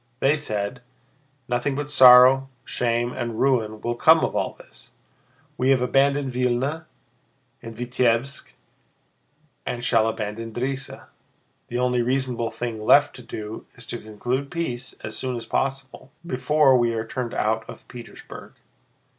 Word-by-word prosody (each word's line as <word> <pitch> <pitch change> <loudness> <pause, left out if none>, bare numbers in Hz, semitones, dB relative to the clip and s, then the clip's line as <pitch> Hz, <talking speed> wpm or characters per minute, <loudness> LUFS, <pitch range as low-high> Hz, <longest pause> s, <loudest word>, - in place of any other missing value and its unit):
They 140 +3 +3
said: 110 -4 -4 0.7
"Nothing 125 +3 -1
but 145 +1 -4
sorrow, 130 0 +7 0.2
shame, 120 0 -1
and 115 -2 -4
ruin 110 -5 +1
will 120 - -1
come 160 +6 +5
of - - -5
all - - -1
this! - - -17 0.7
We 130 - +2
have 135 -1 +4
abandoned 135 +1 +1
Vílna 125 +6 -1 0.8
and 115 -1 -10
Vítebsk 125 +2 0 1.2
and 120 0 -4
shall 115 -2 +3
abandon 110 +1 -4
Drissa. 135 +2 -4 0.6
The 120 - -4
only 125 0 +1
reasonable 125 -2 -1
thing 115 -3 -5
left 145 +6 +5
to - - -10
do 110 -2 -8
is 125 - -10
to 120 - -5
conclude 120 +6 -4
peace 135 -8 -4
as 110 - -5
soon 130 -1 -2
as 115 -1 -6
possible, 135 -1 -3
before 150 -2 +3
we 120 -2 +2
are 110 0 -3
turned 120 +1 -5
out 110 +1 0
of - - -11
Petersburg." 120 -2 -11
125 Hz, 140 wpm, -23 LUFS, 115-135 Hz, 1.2 s, sorrow